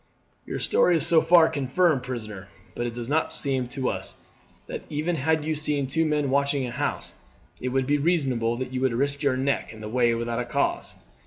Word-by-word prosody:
"Your - - -3
story 175 -2 +3
is - - +1
so 165 -2 +5
far 165 0 +6
confirmed, 150 0 +1
prisoner; 110 -6 -6 0.3
but 120 - -2
it 115 - -6
does 120 -1 -5
not 155 +4 +1
seem 135 -3 0
to 130 +1 -3
us - - -4 0.5
that - - -6
even 155 +4 -1
had 155 +2 +1
you 160 - 0
seen 150 -2 0
two 160 +5 0
men 150 -3 0
watching 140 -1 +1
a 120 - -5
house 140 +4 -3 0.5
it 125 - -1
would 130 +1 0
be 145 +2 +1
reasonable 130 -8 +1
that 130 0 -5
you 130 - -2
would 130 -2 +2
risk 140 +4 0
your 140 -3 +1
neck 135 +2 -1
in 110 - -11
this 105 0 -7
way 120 -1 +3
without 120 +1 -3
cause. 140 - -1
135 Hz, 210 wpm, -25 LUFS, 125-150 Hz, 0.5 s, far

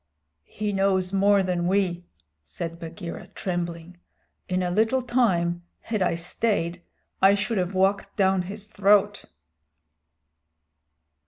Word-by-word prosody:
"He 210 -1 -3
knows 195 -1 +1
more 200 0 +4
than 175 -2 -1
we," 180 -2 0 0.4
said 165 - -6
Bagheera, 170 0 -7
trembling. 175 -1 -4 0.5
"In 185 0 0
a 180 - -1
little 225 +7 +2
time, 180 -9 +1 0.2
had 215 -3 -3
I 180 -2 +2
stayed, 175 0 -1 0.4
I 195 +1 +6
should 205 +1 -1
have 180 +1 -2
walked 195 +2 +1
down 190 -2 +3
his 200 +3 -6
throat." 205 0 +2
190 Hz, 115 wpm, -25 LUFS, 175-205 Hz, 0.5 s, I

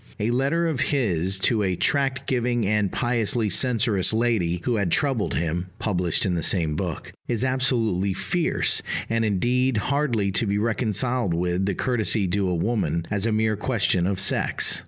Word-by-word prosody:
A 110 +3 0
letter 140 +7 +1
of 155 -6 -2
his 95 - 0
to 110 +1 +2
a 95 -2 0
tract 135 - 0
giving 120 -3 0
and 105 -1 +1
piously 115 -3 0
censorious 115 -2 +2
lady 110 -7 0
who 120 -3 0
had 95 -5 -1
troubled 135 - 0
him 85 +2 -2
(published 90 -5 -1
in 95 - 0
the 85 - -1
same 80 -2 0
book) - - -5
is 120 +1 0
absolutely 115 -8 0
fierce, 170 - +1 0.3
and 115 0 +1
indeed 120 +4 +1
hardly 120 -5 0
to 105 +3 0
be 100 +1 0
reconciled 115 -1 0
with 90 +2 -1
the 100 - -1
courtesy 110 -3 +1
due 95 +2 0
to - - 0
a 90 - 0
woman, 85 -3 -1
as 105 +1 0
a - - 0
mere 110 0 +1
question 100 -5 0
of 95 -1 -1
sex. 100 - +1
110 Hz, 175 wpm, -24 LUFS, 95-125 Hz, 0.3 s, to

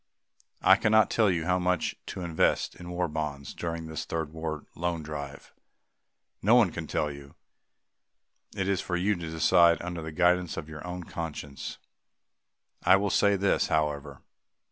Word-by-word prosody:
I 95 +1 +7
cannot 110 0 +4
tell 110 -3 +3
you 85 -3 0
how 90 +1 +2
much 90 -1 0
to - - -5
invest 85 -2 +1
in 90 0 -10
War 90 0 -1
Bonds 75 -3 -4
during 85 -1 -4
this 80 -1 -5
Third 80 -2 -4
War 80 -2 -4
Loan 85 -1 -2
Drive. 70 -2 -7 0.9
No 110 +5 +5
one 110 -8 +5
can - - -6
tell 75 -1 -1
you. 70 +2 -12 1.2
It 95 - -1
is 100 -2 +1
for 90 - -3
you 95 +4 +2
to 85 -2 -6
decide 85 +1 +4
under 85 -1 -5
the 80 0 -6
guidance 90 +1 +2
of 75 - -5
your 75 -1 -9
own 90 0 -5
conscience. 75 -5 -6 1.1
I 90 +2 +7
will 100 0 +1
say 100 +2 +4
this, 100 0 +2
however. 75 -2 -1
85 Hz, 165 wpm, -28 LUFS, 75-90 Hz, 1.2 s, I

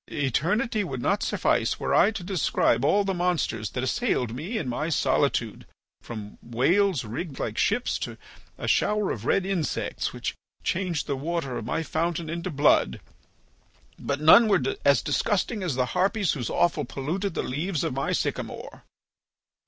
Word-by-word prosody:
Eternity 175 - 0
would 135 -9 -4
not - - +1
suffice - - +1
were - - -1
I 195 - +6
to 220 -4 -5
describe 180 -4 +1
all 205 0 +3
the 195 -1 -1
monsters 175 - -1
that 125 - -3
assailed 130 - 0
me 170 - -4
in 175 - -3
my 140 +6 -2
solitude, 155 - 0 0.3
from 105 -3 -8
whales 150 - +2
rigged 135 +7 -5
like 110 - -3
ships 240 +5 +1
to - - -5 0.4
a - - -5
shower 210 -1 +2
of 110 0 -5
red 195 - +2
insects 185 -6 -2
which - - -4 0.3
changed 175 -4 -1
the 140 - -1
water 145 -2 -3
of - - -4
my 165 - -1
fountain 165 0 -2
into 170 +2 -3
blood. 145 - +3 1.0
But 140 0 -2
none 160 +10 +7
were 205 - +3 0.2
as - - +4
disgusting 220 -4 0
as 175 -8 -1
the 125 -1 +1
harpies 195 +1 +2
whose 125 -6 -3
offal 165 -3 +1
polluted 160 +9 -3
the - - -1
leaves 155 +5 -2
of - - -1
my 135 +1 -1
sycamore." - - -3
165 Hz, 160 wpm, -26 LUFS, 130-195 Hz, 1.0 s, none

